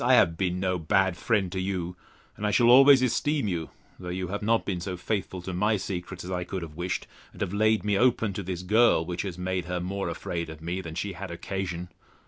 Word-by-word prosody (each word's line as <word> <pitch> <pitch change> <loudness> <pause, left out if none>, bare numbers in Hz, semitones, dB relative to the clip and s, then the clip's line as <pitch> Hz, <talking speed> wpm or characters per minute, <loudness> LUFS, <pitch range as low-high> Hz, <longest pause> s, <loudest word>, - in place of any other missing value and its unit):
I - - +6
have 85 - +4
been 90 +1 -1
no 90 -1 0
bad 95 +2 +2
friend 100 -2 0
to 95 - -3
you; 90 -2 -3 0.4
and 105 - -2
I - - +2
shall 120 +3 +5
always 135 +1 +8
esteem 140 +1 +1
you, 85 -4 -2 0.3
though 90 -1 -6
you 90 0 -3
have 100 +2 -3
not 115 +2 +2
been 90 -3 -2
so 90 +1 -4
faithful 95 -1 -3
to 95 - -5
my 105 +4 +2
secrets 90 -1 -5
as 90 - -6
I 90 -1 -1
could 90 0 -5
have 80 -2 -8
wished, 90 +2 -2 0.3
and - - -12
have 90 - -1
laid 110 +1 +3
me 100 -1 +2
open 120 -4 +3
to 95 - -4
this 90 -1 -4
girl, 105 -3 +4
which 90 +1 -3
has 95 -4 -5
made 90 -1 -2
her 90 0 -2
more 95 +1 -3
afraid 85 0 -4
of 80 -1 -9
me 85 +3 -3
than 80 -3 -8
she 100 +3 -3
had 95 +2 -7
occasion. 90 0 -4
95 Hz, 240 wpm, -27 LUFS, 90-100 Hz, 0.4 s, always